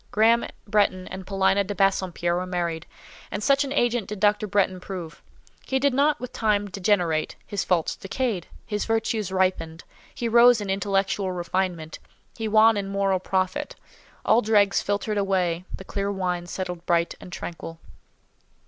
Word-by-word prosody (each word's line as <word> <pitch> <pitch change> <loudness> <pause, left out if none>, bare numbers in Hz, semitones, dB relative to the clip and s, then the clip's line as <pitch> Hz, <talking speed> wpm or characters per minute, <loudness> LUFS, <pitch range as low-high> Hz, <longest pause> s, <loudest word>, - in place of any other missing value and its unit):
Graham 225 +2 +3 0.2
Bretton 200 -3 +1
and 190 0 -8
Paulina 195 0 +2
de 200 +1 -5
Bassompierre 185 -3 +1
were 180 +1 -2
married, 170 -3 -3 0.4
and 205 - -4
such 275 +3 +4
an 275 - -5
agent 240 -4 +1
did 210 -1 -6
Dr. 210 +1 +2
Bretton 190 -2 +1
prove. 180 -3 -7 0.4
He 265 - -1
did 280 0 +2
not 290 +3 +2
with 250 - -7
time 205 -3 0
degenerate; 180 -5 0
his 200 -2 -2
faults 175 -3 0
decayed, 205 -2 -3 0.2
his 210 -2 -2
virtues 225 -3 -1
ripened; 185 -3 0 0.3
he 235 - -2
rose 235 +1 +6
in 200 -2 -3
intellectual 195 0 0
refinement, 175 -2 -3 0.4
he 225 -1 -3
won 220 +1 +5
in 200 -1 -2
moral 195 -1 0
profit: 185 0 -2 0.5
all 225 +2 +5
dregs 205 -3 +3
filtered 205 +1 -1
away, 185 -3 0
the 190 - -11
clear 200 +1 -2
wine 180 -3 -2
settled 180 -1 -5
bright 170 0 +2
and 180 - -11
tranquil. 165 -2 -7
195 Hz, 155 wpm, -25 LUFS, 180-215 Hz, 0.5 s, rose